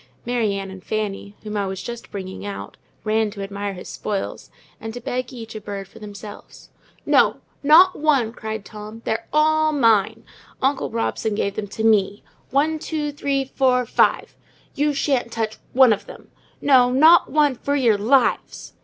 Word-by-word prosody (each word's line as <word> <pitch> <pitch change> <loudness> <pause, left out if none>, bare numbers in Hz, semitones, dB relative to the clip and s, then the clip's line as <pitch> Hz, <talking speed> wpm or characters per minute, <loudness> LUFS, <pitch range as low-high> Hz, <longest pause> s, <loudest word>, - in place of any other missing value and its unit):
Mary 235 -4 0
Ann 195 -1 -5
and 190 -1 -11
Fanny, 205 -1 -4
whom 210 -1 -6
I 200 -1 -1
was 190 0 -5
just 235 -1 -7
bringing 190 -2 -7
out, 200 -1 -7 0.3
ran 220 0 +1
to 200 -1 -7
admire 200 0 -4
his 180 - -9
spoils, 200 -2 -4 0.3
and 225 +1 -7
to - - -5
beg 250 +1 -4
each 225 -3 -9
a 215 - -7
bird 200 -1 -6
for 225 - -16
themselves. 205 0 -11 0.4
"No, - - +4 0.2
not 335 +6 +6
one!" 275 -7 +1
cried 220 -3 -6
Tom. 215 +1 -10
"They're 225 +1 -2
all 310 0 +3
mine; 230 -9 +2 0.4
uncle 270 +1 0
Robson 225 -1 -2
gave 200 -1 -1
them 210 -1 -4
to 220 +2 -5
me—one, 225 +8 0
two, 300 -2 -3
three, 280 -2 -1
four, 250 -2 +2
five—you 295 +4 -1
shan't 270 -4 0
touch 225 -1 -3 0.2
one 255 -3 +6
of 205 - -6
them! - - -13 0.3
no, 255 -3 +5
not 315 +7 +6
one, 295 -2 +3
for 280 +3 -2
your 235 -7 +3
lives!" 245 +4 +1
225 Hz, 165 wpm, -22 LUFS, 205-275 Hz, 0.4 s, not